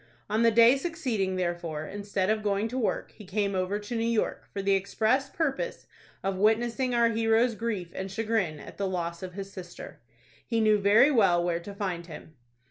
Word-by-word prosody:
On 215 +2 +2
the 230 - +6
day 230 +3 +6
succeeding, 255 - -2
therefore, 175 -4 -3
instead 200 +1 -2
of 215 0 0
going 205 +1 0
to 250 - -4
work, 225 - -1
he 215 - -14
came 200 +1 -1
over 185 +2 -1
to 210 +3 -6
New 225 - 0
York, 230 -2 -1
for 195 - -4
the 195 0 +3
express 220 +7 +1
purpose 325 - -2 0.4
of 195 -1 -1
witnessing 235 +5 +1
our 235 -1 +4
hero's 225 +1 +2
grief 210 -6 -3
and 190 0 -5
chagrin 195 -6 -1
at - - -11
the 200 - -1
loss 170 -2 -3
of 185 -1 -7
his 195 +1 -7
sister. 175 -2 -9 0.4
He 230 -2 -1
knew 215 -1 +4
very 210 +8 +5
well 195 -9 +4
where 170 -1 0
to 200 +4 -9
find 180 -4 -3
him. 160 -1 -11
205 Hz, 195 wpm, -28 LUFS, 185-230 Hz, 0.4 s, the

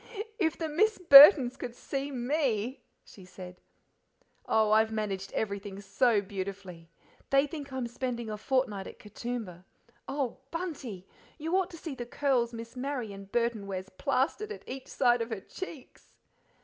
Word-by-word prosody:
"IF 320 -5 +1
the 325 - -2
Miss 420 +8 +2
Burtons 285 -5 +9
could 240 -1 -6
see 275 +2 -4
me!" 255 -2 -1 0.2
she 195 - -14
said. 180 0 -11 0.9
"Oh, 220 -1 +3
I've 220 +1 +4
managed 200 -3 -3
everything 200 -2 -3
so 220 +2 +2
beautifully; 190 -3 -7 0.4
they 275 +1 +4
think 290 -2 -8
I'm 260 -2 -3
spending 235 -1 -4
a 215 - -4
fortnight 215 -3 -1
at - - -11
Katoomba 210 -4 -6 0.4
oh, 275 -3 -3
BUNTY, 275 - -5 0.3
you 325 +3 -2
ought 380 -2 +1
to 335 - -10
see 315 -2 -6
the 240 -2 -7
curls 250 -3 +1
Miss 230 +1 -9
Marian 250 -7 -4
Burton 230 -1 -1
wears 190 -1 -5
plastered 275 - -1
at 430 - -9
each 265 0 -7
side 245 -2 +2
of 230 - -3
her 220 -4 -4
cheeks!" 320 - -10
240 Hz, 150 wpm, -29 LUFS, 205-275 Hz, 0.9 s, Burtons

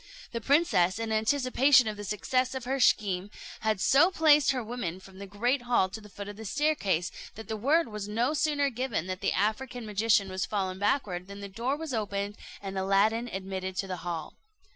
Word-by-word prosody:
The 230 - -4
princess, 245 - +3
in 225 -1 -3
anticipation 255 +3 +4
of 215 - -2
the 205 - -7
success 255 +6 -1
of 260 -2 -5
her 270 +2 -1
scheme, 200 -5 +2 0.3
had 220 -3 0
so 275 - +5
placed 305 -5 +4
her 255 -3 0
women 215 -7 -4
from 190 0 -15
the 200 - -7
great 240 +7 0
hall 240 -6 +2
to 220 +3 -8
the 210 - -14
foot 200 0 -8
of 205 0 -8
the 220 - -8
staircase, 200 - 0 0.2
that 220 - -9
the 220 - -3
word 295 +10 +2
was 210 -2 -6
no 235 +7 0
sooner 290 -2 +1
given 240 -8 -2
that 185 0 -5
the - - +1
African 230 +4 -1
magician 210 -1 +2
was 185 0 -3
fallen 190 -2 -2
backward, 205 -5 0
than 200 0 -9
the 200 - -6
door 235 +8 -2
was 315 -3 -5
opened, 205 -2 -2 0.3
and 195 -1 -4
Aladdin 205 +5 +2
admitted 190 -2 -5
to 195 - -1
the 185 -1 -4
hall. 170 -2 -5
215 Hz, 205 wpm, -29 LUFS, 195-255 Hz, 0.3 s, so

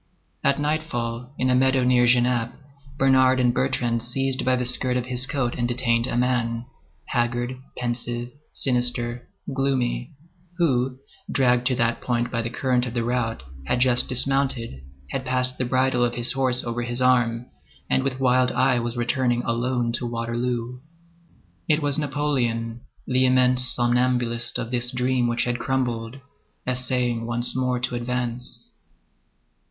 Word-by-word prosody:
At 140 - +2
nightfall, 125 -6 -2
in 130 0 +1
a - - +3
meadow 130 0 +3
near 125 -1 +4
Genappe, 120 -1 +2 0.4
Bernard 130 -1 +4
and 125 -1 +3
Bertrand 120 -3 0
seized 130 +2 -1
by 130 0 +2
the 125 0 -1
skirt 125 +1 +2
of 125 - -2
his 130 +1 0
coat 135 -4 -1
and 120 -1 -1
detained 120 -1 +1
a 120 - -2
man, 120 -2 0 0.4
haggard, 120 +1 -1 0.2
pensive, 120 0 -3 0.2
sinister, 120 -1 -1 0.2
gloomy, 135 +1 -1 0.4
who, 130 -6 +1 0.3
dragged 125 -2 +2
to 130 - +1
that 115 0 0
point 120 -1 -1
by 115 - -1
the 115 - -3
current 125 0 0
of 120 - -6
the 120 - 0
rout, 115 - -1 0.2
had 125 - +1
just 125 -1 +3
dismounted, 130 - 0 0.3
had 130 - -2
passed 125 0 0
the 130 - 0
bridle 130 0 +2
of 120 0 0
his 120 0 +2
horse 130 -2 0
over 120 0 -3
his 120 +1 -2
arm, 120 -2 +2 0.4
and - - +2
with 130 -1 -2
wild 130 -1 +3
eye 130 -2 +3
was 120 +1 -3
returning 120 0 0
alone 120 0 0
to 120 +1 -2
Waterloo. 120 +1 -3 0.9
It 150 0 +3
was 145 +1 0
Napoleon, 125 -6 -1 0.2
the 130 0 +2
immense 125 0 +4
somnambulist 120 -1 +1
of 120 -1 -4
this 120 -1 0
dream 125 -1 +1
which 120 0 0
had 120 0 -1
crumbled, 120 -2 -2 0.5
essaying 125 -2 -1
once 120 +1 +2
more 125 -1 0
to 125 0 -2
advance. 120 0 -4
125 Hz, 150 wpm, -24 LUFS, 120-130 Hz, 0.9 s, near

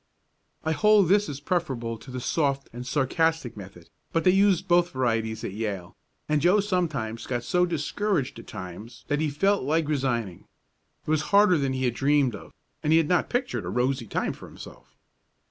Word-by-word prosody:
I 160 - +1
hold 210 +1 +4
this 205 +1 +3
is 140 -1 -5
preferable 135 -8 -2
to - - -13
the 130 0 -5
soft 140 0 -1
and 125 +1 -7
sarcastic 145 0 0
method, 95 -4 -12 0.2
but 165 - 0
they 185 - +5
used 195 -1 +3
both 175 0 +4
varieties 115 -3 -1
at - - -3
Yale, 100 -4 -4 0.3
and 150 -1 +1
Joe 180 +6 +4
sometimes 155 - -2
got 120 -2 -2
so 180 +7 +2
discouraged 165 - -1
at - - -13
times 100 +5 -9
that 145 - +1
he 155 - +1
felt 195 +7 +1
like 155 +3 +1
resigning. 120 - -2 0.6
It - - -2
was 155 -1 +2
harder 200 -4 +5
than 135 -1 0
he 130 0 -1
had 120 - +1
dreamed 140 -1 +2
of, 100 - -10 0.3
and 150 - 0
he 160 - +6
had 165 -2 +2
not 180 -1 +2
pictured 245 +1 -1
a - - -5
rosy 125 -1 0
time - - -1
for - - -12
himself. - - -13
145 Hz, 190 wpm, -26 LUFS, 120-175 Hz, 0.6 s, he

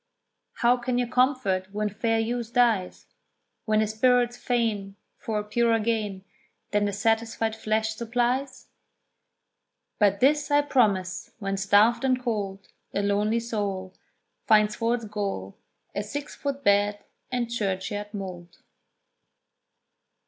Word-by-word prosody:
How 240 +1 +3
can 245 0 -2
you 245 - +2
comfort 240 -7 +1
when 210 +1 -1
fair 225 +2 0
youth 235 +1 -2
dies, 225 -7 +2 0.6
When 215 -1 +2
the - - +3
spirit's 240 +3 +2
fain 220 -6 -1 0.2
For 220 -2 -3
a 210 - -1
purer 230 +2 +2
gain, 210 -4 -2 0.5
Than 205 0 +2
the 205 - 0
satisfied 225 +1 0
flesh 220 0 0
supplies? 245 +4 -1 1.3
"But 200 -2 +3
this 290 +4 +3
I 290 0 +4
promise, 200 -10 +1
when 195 -3 -2
starved 205 +5 +4
and 260 -1 +2
cold 205 -5 -3 0.3
A 200 - +1
lonely 210 +3 +1
soul 200 -5 -3 0.5
Finds 215 -2 +4
for 230 +1 +1
its 235 -2 -6
goal 200 - -4 0.3
A 205 - -1
six 285 +8 -6
foot 280 -1 -4
bed 205 -1 +2 0.3
and 240 -2 -1
churchyard 205 -1 -2
mould." 180 -4 -7
220 Hz, 125 wpm, -26 LUFS, 205-240 Hz, 1.3 s, I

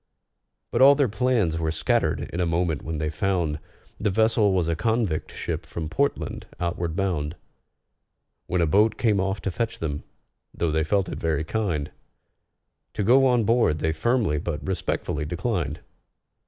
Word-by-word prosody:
But - - +1
all 140 +2 +9
their 140 -2 +3
plans 110 -8 +1
were 80 -1 0
scattered 80 -2 +1
in 85 - -3
a 90 - +2
moment 85 -2 0
when 80 0 -4
they 75 0 -1
found 80 -2 0 0.4
The 105 - +1
vessel 110 +1 +3
was 90 -3 +1
a 85 - +1
convict 110 -2 0
ship - - -4
from 80 -2 -5
Portland, 140 - -1
outward 85 -1 -2
bound; 85 -5 -1 1.1
When 90 -1 +1
a - - +4
boat 105 +7 +3
came 105 -4 +2
off 95 0 -1
to 100 - -1
fetch 115 +5 -2
them, 75 -3 -3 0.5
though 85 -2 0
they 80 +1 +1
felt 95 +3 +1
it - - -5
very 80 -2 0
kind, 85 -6 -2 1.0
To 105 - 0
go 130 +6 +5
on 125 -2 +3
board 115 -8 +3
they 80 +1 0
firmly 105 - +1
but 80 -2 -4
respectfully 85 -5 -2
declined. 85 - -2
90 Hz, 165 wpm, -25 LUFS, 80-110 Hz, 1.1 s, all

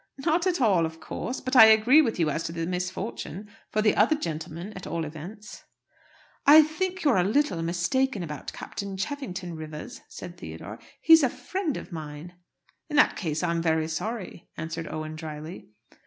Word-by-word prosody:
"Not 340 +2 +2
at 355 -3 +1
all, 190 -9 +3
'of 160 0 -11
course.' 245 +9 -5
But 255 +1 -3
I 225 - +11
agree 220 +7 +7
with 235 -7 -1
you 160 -3 +2
as 165 - -2
to - - -3
the 165 0 -3
misfortune 185 +2 -4 0.2
for 215 - 0
the 215 - +4
other 230 +9 +4
gentlemen, 165 - -5
at 185 - -8
all 165 -1 -2
events!" 175 +8 -9 0.8
"I 305 +2 +10
think 370 +5 -3
you're 285 -9 +4
a 180 - +4
little 215 - +1
mistaken 180 +7 0
about 150 -4 -6
Captain 200 -1 -6
Cheffington, 190 - -4
Rivers," 155 +11 -8
said - - -9
Theodore. - - -8 0.2
"He's 325 0 +8
a 265 - +3
friend 370 -1 -3
of - - -9
mine." 155 +1 -7 0.6
"In 300 - -4
that 295 - +5
case 160 -4 -2
I'm 170 -1 0
very 160 -1 +1
sorry," 190 +3 -5
answered 165 0 -5
Owen 155 0 -5
drily. 155 - -8
185 Hz, 175 wpm, -27 LUFS, 165-255 Hz, 0.8 s, I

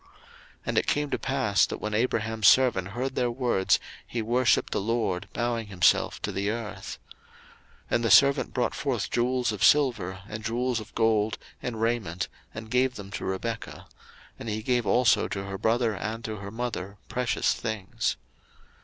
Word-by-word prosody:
01:024:052 380 - -26 0.6
And - - -1
it - - -3
came 145 0 +1
to - - 0
pass, 135 -7 +2
that, - - -4
when 105 0 -4
Abraham's 110 -2 +1
servant 120 -7 +5
heard 125 +7 -3
their 125 -2 +1
words, 120 -6 +2 0.3
he 115 -2 -3
worshipped 120 +2 +2
the - - 0
LORD, 100 -4 -1
bowing 115 -1 -2
himself 95 -3 +2
to 105 - -1
the 100 +1 -1
earth. 110 -2 -5
01:024:053 - - -15 0.7
And 120 - +2
the 115 - +2
servant 140 +6 +5
brought 125 -2 0
forth 135 -5 -2
jewels 125 0 +1
of 105 - -3
silver, 115 -10 +3
and 110 +1 -6
jewels 120 +1 0
of 110 - -11
gold, 110 -1 +2 0.2
and 115 -3 -4
raiment, 110 -6 -1 0.2
and 110 +1 -9
gave 125 0 +2
them 100 -3 -9
to - - -5
Rebekah: 115 +4 -4 0.6
he 110 -1 -3
gave 120 -2 +1
also 125 -1 +4
to 95 - -4
her 100 0 -6
brother 115 +1 +2
and 110 +3 -4
to 110 -1 -4
her 100 0 -7
mother 105 -4 -4
precious 125 -1 0
things. 110 -5 -2
115 Hz, 170 wpm, -27 LUFS, 105-125 Hz, 0.7 s, servant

